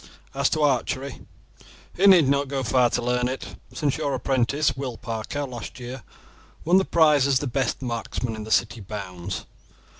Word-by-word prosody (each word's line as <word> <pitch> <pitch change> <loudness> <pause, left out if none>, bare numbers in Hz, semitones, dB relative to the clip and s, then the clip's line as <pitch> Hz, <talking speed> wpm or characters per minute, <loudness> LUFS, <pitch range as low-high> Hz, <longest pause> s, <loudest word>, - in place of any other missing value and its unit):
As 140 0 +2
to 155 - 0
archery, 135 0 0 0.7
he 195 +3 +4
need 180 -7 +7
not 140 +1 +2
go 135 -1 -2
far 125 +1 +3
to - - -1
learn 125 0 +1
it, 130 +1 -5 0.2
since 145 -3 -1
your 145 -3 0
apprentice, 135 +2 +1
Will 130 -4 -5
Parker, 115 +5 -4
last 125 -1 -8
year 125 +1 -7 0.6
won 175 +3 +5
the 190 - +3
prize 150 -5 +4
as 135 -2 +3
the 145 - -2
best 135 0 -1
marksman 115 -1 -3
in 110 - -6
the 110 - -8
city 115 +1 +1
bounds. 95 -3 -6
130 Hz, 175 wpm, -24 LUFS, 120-140 Hz, 0.7 s, need